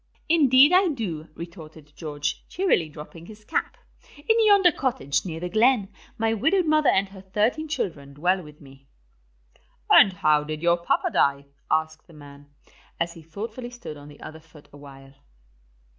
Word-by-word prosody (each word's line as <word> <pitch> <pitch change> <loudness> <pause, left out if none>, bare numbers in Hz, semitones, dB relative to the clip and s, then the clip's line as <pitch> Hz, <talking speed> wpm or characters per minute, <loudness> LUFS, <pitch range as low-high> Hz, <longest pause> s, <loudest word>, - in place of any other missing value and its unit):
"Indeed 290 -1 +5
I 375 +1 +5
do," 190 - -4
retorted 160 -3 -11
George, 145 -3 -4
cheerily 330 - 0
dropping 155 +2 -12
his 215 -1 -14
cap. - - -3 0.4
"In 445 +9 +2
yonder 395 -4 +6
cottage, 140 - -1
near 165 -2 -5
the 180 - -4
glen, 220 +1 +2 0.3
my 225 0 0
widowed 330 - +1
mother 310 -1 +3
and 195 0 +1
her 190 -1 -12
thirteen 215 +11 -1
children 160 - -5
dwell 180 +5 +1
with 150 -2 -14
me." 135 -1 -17 1.0
"And 195 - +7
how 155 -4 +2
did 155 +1 -6
your 170 0 +3
papa 170 - -1
die?" 140 0 +1 0.2
asked 160 0 -1
the 170 - -17
man, 145 -1 -14 0.5
as 170 0 -2
he 165 - -13
thoughtfully 220 +9 -7
stood 240 -10 -9
on 145 0 -13
the 145 0 -15
other 160 0 -10
foot 155 -2 -19
awhile. 135 -1 -14
170 Hz, 160 wpm, -24 LUFS, 150-240 Hz, 1.0 s, And